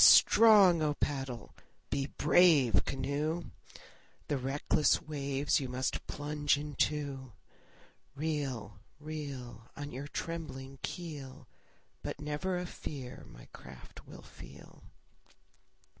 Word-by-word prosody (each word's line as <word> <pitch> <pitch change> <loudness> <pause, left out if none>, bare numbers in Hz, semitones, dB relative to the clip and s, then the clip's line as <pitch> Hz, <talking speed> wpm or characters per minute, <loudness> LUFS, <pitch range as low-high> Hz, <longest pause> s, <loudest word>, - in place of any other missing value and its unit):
Be - - +11
strong, 205 -7 +8
O 150 -1 +1
paddle! 135 -5 -3 0.4
be 135 0 0
brave, 145 - +5
canoe! 145 +5 -2 0.8
The 145 - +1
reckless 135 +2 +2
waves 140 -1 0
you 135 -3 -4
must 125 +1 -2
plunge 145 0 0
into. 145 -3 -2 0.8
Reel, 135 -9 -3 0.2
reel. 140 -6 -7
On 145 0 -5
your 135 +3 -6
trembling 135 -5 -6
keel, 145 -6 -7 0.5
But - - -5
never 150 +5 -2
a 180 - -3
fear 135 -6 -7
my - - -13
craft 65 -1 -12
will - - -11
feel. - - -14
145 Hz, 105 wpm, -32 LUFS, 130-155 Hz, 0.8 s, Be